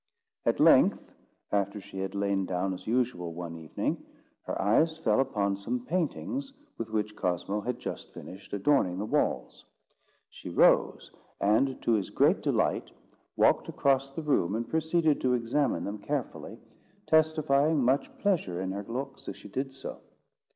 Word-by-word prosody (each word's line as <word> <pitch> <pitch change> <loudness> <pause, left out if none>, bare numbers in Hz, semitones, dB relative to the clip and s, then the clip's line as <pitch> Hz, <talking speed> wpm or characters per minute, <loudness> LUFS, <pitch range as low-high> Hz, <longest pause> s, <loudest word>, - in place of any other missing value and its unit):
At - - +2
length, - - +5 0.4
after 100 0 0
she 95 -1 -9
had 95 +1 -4
lain 100 -1 0
down 95 +1 -1
as 90 - -9
usual 115 -8 0
one 85 -1 -6
evening, 80 -1 -3 0.4
her - - -3
eyes 155 +12 +3
fell 110 -8 +2
upon 100 -7 0
some 120 +5 -3
paintings 220 - -2 0.3
with 115 -1 -4
which 105 -1 -2
Cosmo 95 +3 -1
had 125 +3 -3
just - - -6
finished 95 +2 -11
adorning 100 -3 +2
the 100 - -2
walls. - - -1 0.6
She - - -10
rose, - - +3 0.3
and 115 +6 +2
to - - +2
his 105 -4 +1
great - - +3
delight, - - 0 0.5
walked - - +3
across 135 0 +1
the 145 +4 -6
room, 105 - +1
and 115 +1 -2
proceeded 160 -1 +1
to 125 -1 +2
examine 125 +3 0
them 105 +1 -4
carefully, 140 +3 -4 0.5
testifying 155 -2 +3
much 130 +3 +2
pleasure 165 - 0
in 95 0 -2
her 100 +1 -4
looks 135 +4 -5
as - - -6
she - - -12
did 135 +6 -3
so. 135 0 -8
115 Hz, 155 wpm, -29 LUFS, 100-140 Hz, 0.6 s, length